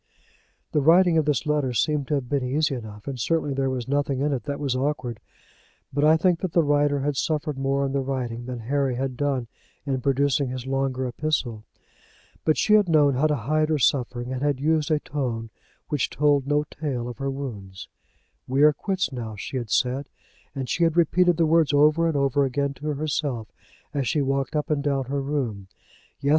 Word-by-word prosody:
The 150 - +2
writing 170 +2 +5
of 155 - 0
this 150 +1 0
letter 150 -4 0
seemed 145 +3 0
to 150 - +1
have 135 -3 -2
been 140 0 0
easy 145 +3 0
enough, 110 -3 -8
and 135 -2 -4
certainly 155 +2 0
there 135 0 0
was 130 -2 -3
nothing 140 -1 0
in 145 +1 +1
it 125 -5 -3
that 140 0 -3
was 140 -3 -1
awkward; 130 -4 -2 0.7
but 145 +1 +1
I 155 +1 +6
think 175 0 +2
that 185 -4 -3
the 170 - +4
writer 145 -1 +2
had 145 +1 -1
suffered 150 0 -1
more 135 +1 0
in 135 - -2
the 140 - +1
writing 125 -3 -4
than 125 -2 -5
Harry 135 +2 0
had 130 0 -2
done 135 -2 -1 0.4
in 135 -3 -1
producing 140 0 +1
his 130 -1 -5
longer 135 -1 -1
epistle. 120 -4 -2 0.8
But 155 - +2
she 210 - +3
had 210 -4 +5
known 150 -3 +4
how 140 +5 +2
to 150 - +1
hide 155 +6 0
her 155 - +2
suffering, 125 -2 0
and 130 - -4
had 145 -2 0
used 155 +2 +1
a 155 -1 +2
tone 120 -7 -4 0.4
which 150 -4 0
told 145 -2 +2
no 145 +1 +2
tale 140 -5 -4
of 120 +1 -8
her 135 0 -2
wounds. 105 -9 -6 0.6
We 135 +3 +2
are 150 0 +7
quits 185 -1 -2
now, 115 -4 -5
she 115 +6 -5
had 120 -3 -4
said, 130 +7 0 0.5
and 135 -2 -3
she 170 - 0
had 165 0 +2
repeated 175 +1 +3
the 165 - +3
words 160 -2 +3
over 150 +3 +4
and 160 -3 0
over 140 0 +2
again 140 +1 -1
to 150 +2 -8
herself 140 -6 -2 0.4
as 140 -4 -1
she 145 +3 +1
walked 135 +1 -1
up 150 +1 -1
and 145 -2 +1
down 140 -2 0
her 140 +2 -2
room. 130 -9 -3 0.5
Yes! 140 - 0
140 Hz, 205 wpm, -25 LUFS, 130-150 Hz, 0.8 s, are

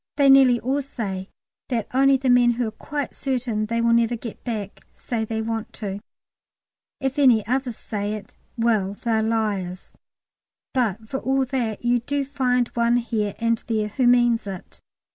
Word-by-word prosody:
They 280 -2 +5
nearly 260 -3 +6
all 265 +5 0
say 200 -8 -5 0.4
that 235 -5 -1
only 270 +1 +5
the 260 -1 +1
men 245 -1 +5
who 240 0 -1
are - - -4
quite 285 +6 -5
certain 245 -5 -2
they 230 +1 0
never 235 0 +3
will - - -6
get 230 -2 -8
back, 210 -5 -5
say 230 -2 -3
they 220 0 -3
want 225 -1 -4
to. 200 -2 -5 1.0
If 270 +1 -2
any 245 -7 +5
others 250 0 -1
say 205 0 -3
it, 210 - -10 0.2
"well, 215 -4 +1
they're 225 0 0
liars." 210 -5 -2 0.8
But 220 -4 -1
for 265 +4 -3
all 270 0 +1
that, 240 -4 -3
you 240 0 +3
do 280 +4 -2
find 250 -3 +1
one 235 0 +2
here 220 -4 -2
and 230 0 +1
there 215 -2 0
who 250 +4 +1
means 240 -3 +3
it. 190 -2 -8
235 Hz, 170 wpm, -23 LUFS, 215-255 Hz, 1.0 s, nearly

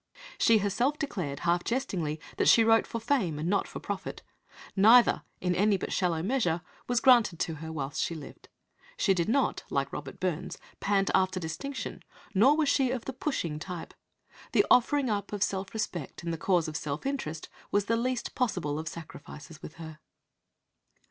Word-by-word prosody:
She 230 - +5
herself 225 +8 0
declared, 180 - -4
half 175 0 +1
jestingly, 185 - -2 0.2
that - - +2
she 230 - +7
wrote 225 0 +4
for 230 - -4
fame 225 - 0
and 155 +2 -3
not 200 +2 +1
for - - -7
profit. 195 -1 -5 0.5
Neither, 225 +5 +6 0.2
in 180 0 +1
any 205 +2 +3
but - - -4
shallow 170 -4 0
measure, 185 -7 +1 0.3
was 245 -1 +2
granted 240 -9 +5
to 165 - -1
her 160 0 -6
whilst 145 -3 -3
she 170 - -1
lived. 150 -3 -11 0.5
She 195 - +3
did 175 +1 0
not, 270 +3 +1
like 140 0 -1
Robert 140 -3 -7
Burns, 180 -3 -2 0.2
"pant 195 -1 +1
after 185 -1 +2
distinction," 180 - -5 0.3
nor 255 +10 +5
was 310 -2 +2
she 270 -2 +3
of 250 -2 -3
the 265 - -4
"pushing" 175 - -2
type. 175 0 -7 0.6
The - - +5
offering 270 +3 +4
up 200 -1 -2
of 205 -1 +1
self 190 0 -2
respect 175 -8 -4
in 170 - -2
the - - -1
cause 175 -1 +2
of 155 - -6
self 150 - -4
interest 165 - -3 0.2
was 205 -1 +1
the 230 - +1
least 250 +1 -2
possible 175 - -1
of 160 - -6
sacrifices 155 -1 -9
with - - -9
her. 160 -2 -9
190 Hz, 180 wpm, -29 LUFS, 160-235 Hz, 0.6 s, she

